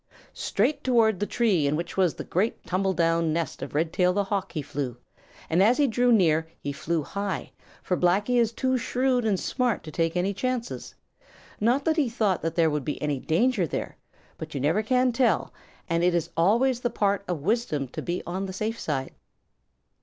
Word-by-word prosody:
Straight 250 +9 0
toward 225 -6 +3
the 205 - -1
tree 195 -11 +2
in 145 - +1
which 170 +2 -4
was 185 -4 +2
the - - -6
great 200 +6 -1
tumble 190 +1 0
down 165 -1 +2
nest 165 +1 -2
of - - -6
Redtail 170 +4 +2
the 205 +1 +1
Hawk 195 -1 -2
he 155 -4 -3
flew, 130 -4 -4 0.5
and 170 +3 +2
as 225 +5 +5
he 295 - +4
drew 245 0 +2
near, 165 -7 +3
he 145 - -4
flew 160 +2 -2
high, 200 +4 -4 0.3
for 180 - 0
Blacky 205 +8 +2
is 230 -2 +2
too 260 +1 0
shrewd 250 0 0
and 200 -4 +1
smart 250 -4 -1
to 155 - -8
take 165 +2 0
any 190 +3 0
chances. 250 +3 -3 0.6
Not 245 +6 +2
that 320 0 +2
he 285 -6 +2
thought 215 -5 0
that 165 - -2
there 165 -2 +3
could 150 -2 -1
be 150 - -3
any 150 -2 -1
danger 190 - +1
there; - - -4 0.4
but 155 -1 -7
you - - -1
never 155 +10 +2
can 250 +3 +2
tell, 240 +1 +1 0.3
and 170 0 0
it 175 0 +3
is 170 -1 -1
always 235 +9 +3
the 240 - -1
part 200 -3 0
of 175 -5 -3
wisdom 180 - 0
to - - -6
be 175 +1 -3
on 190 +3 -3
the 190 - -6
safe 220 +4 -3
side. 135 -4 -3
190 Hz, 200 wpm, -26 LUFS, 165-235 Hz, 0.6 s, as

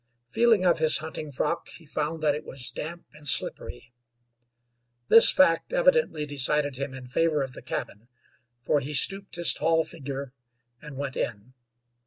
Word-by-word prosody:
Feeling 225 - +3
of 175 -2 +3
his 155 -1 +3
hunting 155 -1 -7
frock, 155 +5 -2
he 165 - -12
found 155 +2 -4
that 150 -2 +3
it 150 +1 -5
was 130 -4 -4
damp 170 +3 -7
and 150 -1 -7
slippery. 120 -2 +1 1.2
This 230 - +8
fact 165 -3 +2
evidently - - +2
decided 145 0 0
him 135 0 -5
in 130 -1 -9
favor 150 +3 0
of 130 -1 -7
the - - -11
cabin, 105 +3 -6 0.6
for 145 - +2
he 140 +2 -6
stooped 195 +8 +1
his 170 -1 +4
tall 160 0 +1
figure 140 -4 -7 0.5
and 150 -3 -10
went 140 -1 -5
in. 115 +3 -5
150 Hz, 160 wpm, -26 LUFS, 135-165 Hz, 1.2 s, This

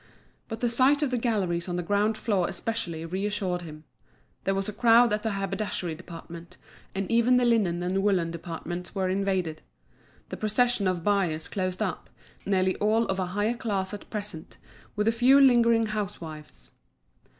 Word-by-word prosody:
But 225 -1 -6
the 240 - +2
sight 270 +5 +3
of 275 - 0
the 250 - +1
galleries 190 -7 -1
on 175 - -2
the 175 - -2
ground 205 +4 +1
floor 200 -6 0
especially 170 -8 -3
reassured 190 0 -2
him. 155 -2 -10 0.6
There 195 - +1
was 195 0 -2
a 210 - -4
crowd 235 0 +5
at 210 - 0
the 220 -1 -2
haberdashery 195 -3 -2
department, 170 +1 -10 0.4
and 195 0 -1
even 235 +2 +4
the 250 - +3
linen 195 -7 +2
and 185 +2 0
woollen 185 -5 +1
departments 175 +2 -6
were 190 -1 0
invaded. 185 -4 -1 0.7
The - - -5
procession 215 -1 +2
of 180 -2 -1
buyers 180 -6 +1
closed 185 -2 -2
up, - - -4 0.4
nearly 190 -1 +2
all 220 +2 +2
of 190 0 -1
a 185 - -1
higher 210 +3 +2
class 205 -5 -2
at 205 - -8
present, 205 -7 -5 0.4
with 210 +1 0
a - - +5
few 250 +4 +5
lingering 235 -4 +5
housewives. 160 - -6
195 Hz, 170 wpm, -27 LUFS, 175-225 Hz, 0.7 s, crowd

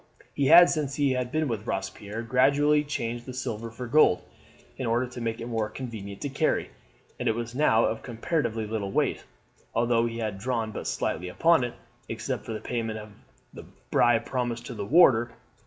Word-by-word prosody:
He 140 - +1
had, 175 +3 +9
since 145 -4 -1
he 140 -2 +2
had 125 -1 -2
been 155 +1 0
with 110 -2 -4
Robespierre, 105 +3 -4
gradually 140 +5 +3
changed 120 -5 -4
the 130 - -6
silver 115 -3 -4
for 120 +2 -7
gold 120 -7 +4 0.5
in 130 - -4
order 120 +2 +1
to 125 0 -8
make 115 -1 -2
it 115 - -5
more 115 -3 -2
convenient 105 -6 -7
to 145 - -2
carry, 140 +3 0 0.5
and - - 0
it 110 - +1
was 120 0 -4
now 125 -5 +3
of 110 0 -2
comparatively 115 -2 -2
little 105 -2 -3
weight, - - 0 0.5
although 115 0 +2
he 115 0 -5
had 110 -4 -3
drawn 115 -1 -2
but - - -6
slightly 90 - -2
upon 165 - +3
it, 120 - -4 0.3
except 120 +1 -4
for 115 - -3
the 110 - -4
payment 115 -2 -3
of 105 0 -9 0.4
the - - -10 0.3
bribe 120 -1 +3
promised 120 -2 -2
to 125 - -6
the 105 -3 -5
warder. 120 -6 +5
120 Hz, 190 wpm, -27 LUFS, 110-130 Hz, 0.5 s, had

